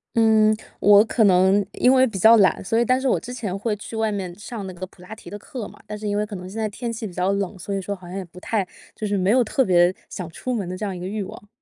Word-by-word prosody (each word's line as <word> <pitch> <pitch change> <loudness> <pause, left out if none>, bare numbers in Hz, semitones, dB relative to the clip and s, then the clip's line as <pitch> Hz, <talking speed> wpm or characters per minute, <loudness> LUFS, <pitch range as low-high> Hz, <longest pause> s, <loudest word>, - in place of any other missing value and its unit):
嗯， 220 -1 +4 0.2
我 205 0 +7
可 225 0 +1
能 190 +1 +4
因 250 - +3
为 260 0 +5
比 220 -6 -4
较 225 +3 +7
懒， 195 -3 +3
所 225 +4 0
以 235 - +3
但 255 +2 +2
是 270 - 0
我 - - +2
之 245 - -8
前 205 -6 -4
会 210 +1 -1
去 215 +2 -9
外 220 -1 0
面 190 -3 -4
上 215 -1 -7
那 185 - -7
个 185 +1 -6
普 180 - -20
拉 180 +4 -9
提 220 - -16
的 205 - -7
课 230 +1 -7
嘛。 - - -16
但 210 - -5
是 210 0 -5
因 205 - -1
为 210 - +1
可 210 -1 -6
能 180 0 -7
现 220 +4 -5
在 215 - 0
天 230 +3 -5
气 220 -1 -5
比 180 - -11
较 180 +2 0
冷， 200 -1 -2
所 200 +3 -5
以 195 - -1
说 200 +2 -4
好 180 -2 -14
像 180 - -8
也 195 - -3
不 180 +1 -14
太， 200 0 -1 0.3
就 215 - -4
是 205 - 0
没 190 +2 +2
有 250 +1 +4
特 260 +4 +1
别 175 -2 +4 0.2
想 180 -3 -6
出 250 +9 -4
门 200 -7 -3
的 185 - -5
这 210 - -4
样 195 -2 -3
一 - - -7
个 180 - -5
欲 205 0 -3
望。 205 +1 -11
205 Hz, 340 characters per minute, -23 LUFS, 185-220 Hz, 0.3 s, 我